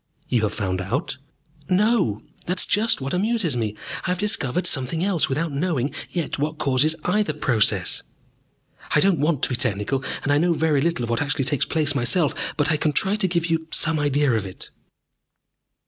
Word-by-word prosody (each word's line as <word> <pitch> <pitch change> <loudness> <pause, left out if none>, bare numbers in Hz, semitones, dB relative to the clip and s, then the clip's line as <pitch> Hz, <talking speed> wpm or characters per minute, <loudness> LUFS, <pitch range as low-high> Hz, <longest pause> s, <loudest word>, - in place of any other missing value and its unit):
"You 120 -3 +1
have 105 -1 0
found 95 -3 -1
out?" 130 - -3 0.5
"No, 190 - +2 0.2
that 180 +2 0
is - - +5
just 220 -4 +1
what 135 +1 -3
amuses 195 - 0
me. 110 -3 -2 0.3
I - - -1
have 180 - 0
discovered 180 - 0
something 145 +5 0
else 190 -5 +1
without 155 +4 -1
knowing 140 -2 -1 0.2
yet 170 -5 -3
what 150 +2 -2
causes 140 +3 +2
either 190 -3 +1
process. 120 -7 +1 0.9
"I - - +6
don't 190 -5 +3
want 150 -1 0
to - - +2
be 125 - 0
technical, 120 +2 0 0.2
and 145 - 0
I 145 - +3
know 175 +2 +2
very 155 -3 +1
little 165 -5 0
of 120 - -3
what 115 - 0
actually 145 -2 -1
takes 135 0 +1
place 150 -3 +1
myself. 140 +4 +2 0.2
But 145 +1 +2
I 155 - +2
can 150 0 0
try 195 +8 +2
to 205 -3 +1
give 170 -2 0
you 165 -1 -1
some 160 0 +1
idea 145 -1 +2
of 110 -3 0
it." 95 - -10
150 Hz, 195 wpm, -23 LUFS, 130-170 Hz, 0.9 s, I